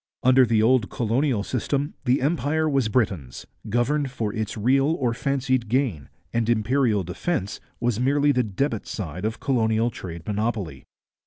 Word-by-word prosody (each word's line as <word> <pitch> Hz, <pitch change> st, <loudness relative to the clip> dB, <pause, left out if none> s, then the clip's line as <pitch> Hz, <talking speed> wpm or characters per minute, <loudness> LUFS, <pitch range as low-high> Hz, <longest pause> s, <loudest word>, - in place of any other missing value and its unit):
Under 130 Hz, 0 st, +6 dB
the 110 Hz, -1 st, +3 dB
old 115 Hz, -3 st, +3 dB
colonial 120 Hz, -1 st, 0 dB
system 140 Hz, +6 st, -2 dB
the 125 Hz, +1 st, +2 dB
empire 155 Hz, +1 st, +1 dB
was 135 Hz, -6 st, +1 dB
Britain's, 95 Hz, -, -1 dB, 0.2 s
governed 135 Hz, +6 st, +1 dB
for 110 Hz, -5 st, -3 dB
its 110 Hz, -1 st, -3 dB
real 135 Hz, +8 st, +2 dB
or 120 Hz, -4 st, 0 dB
fancied 130 Hz, -2 st, -1 dB
gain, 115 Hz, -, 0 dB, 0.2 s
and 115 Hz, -1 st, 0 dB
imperial 115 Hz, -2 st, +2 dB
defence 95 Hz, -, -3 dB, 0.2 s
was 120 Hz, -2 st, 0 dB
merely 145 Hz, +3 st, +3 dB
the 125 Hz, -2 st, +2 dB
debit 110 Hz, +1 st, -2 dB
side 90 Hz, 0 st, -5 dB
of 110 Hz, +1 st, -2 dB
colonial 115 Hz, -2 st, +1 dB
trade 85 Hz, -6 st, -8 dB
monopoly. 105 Hz, -3 st, -3 dB
120 Hz, 150 wpm, -24 LUFS, 105-135 Hz, 0.2 s, Under